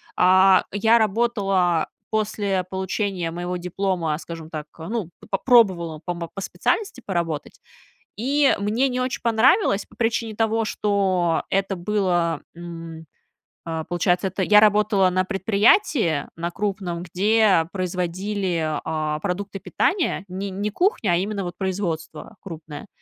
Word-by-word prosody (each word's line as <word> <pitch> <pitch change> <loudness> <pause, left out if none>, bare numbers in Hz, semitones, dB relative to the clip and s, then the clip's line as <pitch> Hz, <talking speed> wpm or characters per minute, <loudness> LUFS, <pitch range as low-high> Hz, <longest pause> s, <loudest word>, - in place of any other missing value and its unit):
а, 185 +1 +5
я 220 +3 +4
работала 195 -6 +1 0.2
после 205 -3 -1
получения 190 -2 -2
моего 175 +1 -4
диплома, 180 -3 -1
скажем 165 -1 -9
так, 155 -2 -6
ну, 185 +2 -4 0.2
попробовала 190 -8 +3
по 175 - -2
мо 170 -1 -6
по 195 - -6
специальности 425 - -2
поработать, 170 -5 -3 0.6
и 275 +5 +2
мне 225 +7 +1
не 250 0 -2
очень 255 +1 -2
понравилось 230 - +3
по 220 - -22
причине 225 -1 -1
того, 225 +1 +1
что 190 -6 +1
это 195 0 0
было, 175 -3 0
м, 165 -1 -9 0.6
а, 160 -1 -4
получается, 175 +2 0
это 190 +1 -2
я 210 +3 +6
работала 210 -2 +4
на 185 +1 +1
предприятии 200 - +2
на 170 +1 -3
крупном, 185 -3 -3
где 195 -1 +3
производили, 180 -2 -2
а, 155 -1 -2
продукты 195 +2 -3
питания, 350 - 0
не 190 +2 -4
не 200 +3 -2
кухня, 235 - +1
а - - +3
именно 200 +2 -2
вот 175 0 -5
производство 180 -1 -4
крупное. 160 +1 -9
190 Hz, 130 wpm, -23 LUFS, 170-210 Hz, 0.6 s, я